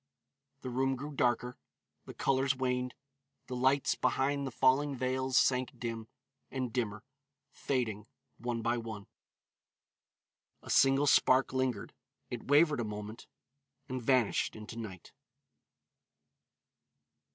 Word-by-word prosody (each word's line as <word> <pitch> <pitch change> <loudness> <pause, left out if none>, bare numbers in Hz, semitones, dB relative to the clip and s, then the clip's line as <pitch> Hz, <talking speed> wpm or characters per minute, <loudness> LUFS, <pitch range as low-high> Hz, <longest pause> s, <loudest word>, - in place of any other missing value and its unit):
The 130 - -5
room 135 +2 +1
grew 145 +4 -6
darker, 125 -2 0 0.5
the - - -10
colors 135 0 +1
waned, 125 -1 -1 0.5
the 125 - -5
lights 130 +2 +2
behind 140 +1 0
the - - -5
falling 135 +3 +3
veils 130 0 0
sank 125 -1 +2
dim, 115 -2 -5 0.4
and 130 -4 -3
dimmer, 110 -4 -2 0.5
fading, 110 -6 -2 0.3
one 120 -1 -3
by 120 +1 +1
one; 110 -3 -7 1.6
a - - -6
single 135 +1 +5
spark 130 -2 +4
lingered, 130 -5 -1 0.4
it - - -6
wavered 145 0 +5
a - - 0
moment, 105 +1 -7 0.6
and 130 -2 -4
vanished 125 -2 +2
into 110 +1 -9
night. 105 -7 -8
125 Hz, 115 wpm, -32 LUFS, 115-135 Hz, 1.6 s, single